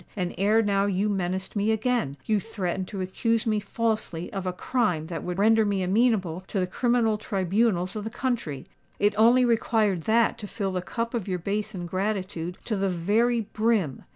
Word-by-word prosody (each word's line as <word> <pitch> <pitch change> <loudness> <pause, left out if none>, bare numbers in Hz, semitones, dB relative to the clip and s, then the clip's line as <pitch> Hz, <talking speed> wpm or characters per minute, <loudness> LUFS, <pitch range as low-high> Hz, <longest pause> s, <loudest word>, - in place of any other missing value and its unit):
And 180 -2 -2
ere 210 +5 +3
now 200 -1 +2
you 200 +2 0
menaced 190 0 -2
me 205 +2 +2
again: 220 - 0
you 215 -1 +2
threatened 190 -3 -3
to 195 - -5
accuse 225 +5 0
me 215 -2 +1
falsely 215 -5 -2
of 190 -2 -3
a - - +1
crime 180 -5 0
that 165 -1 -5
would 180 0 -4
render 220 +2 +4
me 200 -2 0
amenable 190 -4 +2
to 200 - -2
the 185 - +1
criminal 225 +1 +1
tribunals 190 -1 0
of 210 - -3
the 220 - -3
country. 230 - -3 0.3
It 205 +1 +2
only 240 +4 +5
required 220 -6 +1
that 230 +1 +3
to 210 - -6
fill 195 -2 -3
the 185 -1 -2
cup 230 +6 -4
of 230 -5 -2
your 185 -2 -1
base 205 +4 -3
ingratitude 185 -1 -3
to 220 - -1
the 195 -1 0
very 215 +7 +2
brim. 215 - 0
205 Hz, 185 wpm, -26 LUFS, 185-225 Hz, 0.3 s, only